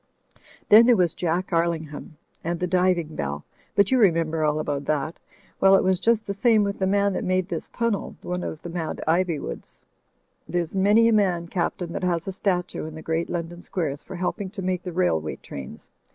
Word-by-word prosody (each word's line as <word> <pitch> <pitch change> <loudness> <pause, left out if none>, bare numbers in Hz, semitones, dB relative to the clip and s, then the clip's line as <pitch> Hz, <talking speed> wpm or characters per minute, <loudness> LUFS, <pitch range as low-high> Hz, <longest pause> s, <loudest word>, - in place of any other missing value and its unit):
Then 225 +3 +8
there 245 - +6
was 175 -3 +2
Jack 180 +2 -2
Arling 165 -1 +1
ham 150 +1 -10 0.3
and 170 +1 -2
the 180 - 0
diving 180 -3 +1
bell 70 +1 -4
— - - -34
but 200 +2 +4
you 260 - +4
remember 165 -6 +2
all 150 0 +1
about 145 -2 -2
that. 155 +2 -1 0.4
Well, 195 0 +6
it - - +4
was 185 -1 +2
just 230 -1 +2
the 200 - -3
same 215 +1 +3
with 200 0 -2
the 190 - +1
man 200 0 +2
that - - -2
made 185 0 0
this - - -4
timnel— 230 -4 -2
one 180 0 -3
of 155 - -6
the 175 - -6
mad 170 -2 -4
Iv3rwoods. 160 - -1 0.7
There's 175 -1 -1
many 205 +4 +4
a 230 - +4
man, 180 -5 +2
Caplain, 175 -1 -2
that 185 - -4
has 170 -1 0
a - - -1
statue 180 -4 -2
in 160 - -9
the 160 - -9
great 165 +1 -1
London 175 0 -4
squares 150 -7 -3
for - - -9
helping 185 +2 -2
to 195 0 -7
make 185 -1 -1
the 180 - -6
railway 120 - 0
trains. 70 -2 -10
180 Hz, 210 wpm, -24 LUFS, 160-195 Hz, 0.7 s, Then